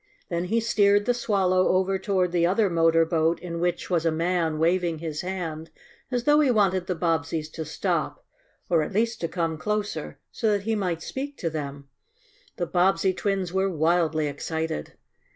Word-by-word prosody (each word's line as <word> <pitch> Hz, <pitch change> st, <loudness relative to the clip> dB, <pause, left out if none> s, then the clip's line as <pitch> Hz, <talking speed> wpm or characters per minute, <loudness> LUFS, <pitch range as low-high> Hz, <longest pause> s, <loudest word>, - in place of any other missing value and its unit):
Then 170 Hz, 0 st, -1 dB
he 225 Hz, +6 st, +1 dB
steered 205 Hz, -2 st, +3 dB
the 245 Hz, -, +3 dB
Swallow 190 Hz, -6 st, +2 dB
over 190 Hz, +1 st, +1 dB
toward 185 Hz, -3 st, 0 dB
the 175 Hz, -1 st, +1 dB
other 200 Hz, +1 st, +2 dB
motor 165 Hz, 0 st, +4 dB
boat 160 Hz, 0 st, +1 dB
in 170 Hz, -2 st, -5 dB
which 175 Hz, 0 st, -1 dB
was 170 Hz, -2 st, +2 dB
a 165 Hz, -, +3 dB
man 165 Hz, -1 st, 0 dB
waving 170 Hz, +1 st, +1 dB
his 155 Hz, -1 st, -4 dB
hand, 165 Hz, -4 st, -5 dB, 0.4 s
as 245 Hz, -2 st, -1 dB
though 295 Hz, +3 st, +5 dB
he 295 Hz, -3 st, +4 dB
wanted 190 Hz, -6 st, +2 dB
the 180 Hz, -, -1 dB
Bobbseys 160 Hz, -2 st, -1 dB
to 160 Hz, -, -6 dB
stop, 150 Hz, -, -2 dB, 0.4 s
or 170 Hz, -3 st, +3 dB
at 155 Hz, -, -4 dB
least 230 Hz, +3 st, 0 dB
to 165 Hz, -, 0 dB
come 165 Hz, -2 st, -2 dB
closer, 210 Hz, -4 st, -3 dB
so 220 Hz, -2 st, 0 dB
that 200 Hz, -1 st, -1 dB
he 225 Hz, +2 st, 0 dB
might 180 Hz, -6 st, -2 dB
speak 280 Hz, +2 st, -5 dB
to 165 Hz, -, -2 dB
them. 140 Hz, -2 st, -6 dB, 0.7 s
The 175 Hz, -, -2 dB
Bobbsey 185 Hz, +2 st, +2 dB
twins 195 Hz, -2 st, -2 dB
were 190 Hz, 0 st, +1 dB
wildly 160 Hz, -2 st, +1 dB
excited. 155 Hz, -, -4 dB
180 Hz, 180 wpm, -25 LUFS, 165-195 Hz, 0.7 s, though